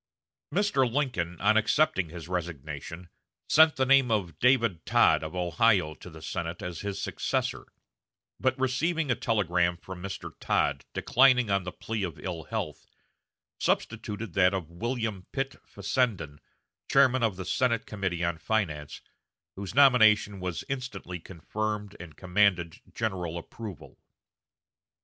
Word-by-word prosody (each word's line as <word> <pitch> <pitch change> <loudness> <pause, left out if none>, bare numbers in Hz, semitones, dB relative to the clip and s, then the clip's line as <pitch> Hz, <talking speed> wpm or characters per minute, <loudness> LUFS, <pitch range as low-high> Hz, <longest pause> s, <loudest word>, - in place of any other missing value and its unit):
Mr. 140 - +2
Lincoln, 115 - -1
on 110 +2 +4
accepting 110 - +2
his 85 0 -9
resignation, 80 -1 -5 0.4
sent 160 0 +6
the 135 -2 +1
name 135 -1 +5
of 90 -8 -1
David 115 -9 +3
Tod - - +4
of 80 +2 -6
Ohio 90 -2 +2
to 90 - -12
the 80 -2 -12
Senate 85 -1 -4
as 90 -2 -5
his 100 -1 -4
successor; - - -2 0.7
but, 130 -1 +1
receiving 145 +4 0
a - - +3
telegram 90 -7 +1
from 90 +1 -9
Mr. 95 +1 -6
Tod 70 -1 0
declining 125 -4 +4
on 100 -2 +1
the 90 - -4
plea 110 +3 -4
of 90 -6 -3
ill 85 -4 -5
health, - - -5 0.7
substituted 110 -3 -2
that 95 0 +4
of 85 -4 -5
William 110 0 -3
Pitt 135 0 -3
Fessenden, 95 - -1 0.5
chairman 130 -2 +5
of 110 -5 +1
the 95 0 -6
Senate 115 +2 +1
Committee 95 -4 -3
on 85 -1 -1
Finance, 75 -6 -2 0.5
whose 100 +2 -6
nomination 110 -7 +5
was 90 -2 -4
instantly 115 -9 -5
confirmed 105 +4 -4
and 85 -3 -11
commanded 90 -3 +1
general 90 -6 -3
approval. 100 +2 -9
100 Hz, 135 wpm, -28 LUFS, 85-120 Hz, 0.7 s, sent